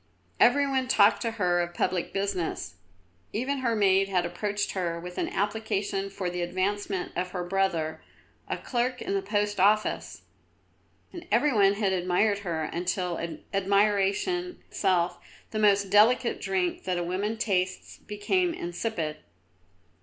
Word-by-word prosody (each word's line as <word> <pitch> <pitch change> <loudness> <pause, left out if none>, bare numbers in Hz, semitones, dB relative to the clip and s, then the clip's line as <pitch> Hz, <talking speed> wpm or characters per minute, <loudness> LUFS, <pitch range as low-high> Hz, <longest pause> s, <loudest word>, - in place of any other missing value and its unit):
Every 285 0 +5
one 265 -1 0
talked 205 -4 +4
to 230 - -1
her 175 -3 +2
of 175 0 -4
public 180 -2 -1
business. 185 - -2 0.6
Even 265 +5 -1
her 235 -3 0
maid 195 -2 +3
had 180 -2 +1
approached 205 +4 -2
her 170 -3 -2
with 180 +1 -7
an - - -1
application 200 -1 -1
for 195 -2 -4
the 180 0 -3
advancement 185 +2 -2
of 180 +1 -3
her 180 -2 -2
brother, 175 -4 -1 0.5
a - - -1
clerk 250 0 -1
in - - -2
the 195 - +1
Post 205 0 -1
Office; 210 +3 +1 0.9
and 350 0 -9
every 295 -2 +3
one 200 -2 +5
had 200 -2 0
admired 185 +3 +1
her 170 -5 -3
until 180 +1 -2 0.3
admiration 200 - +1
itself, 180 -3 +1 0.3
the 215 - -2
most 200 -2 +3
delicious 230 +4 +4
drink 190 -2 -1
that 185 -1 0
a 175 - -1
woman 200 +6 -2
tastes, 185 -4 -1
became 335 - 0
insipid. 170 -3 -3
195 Hz, 145 wpm, -27 LUFS, 180-215 Hz, 0.9 s, Every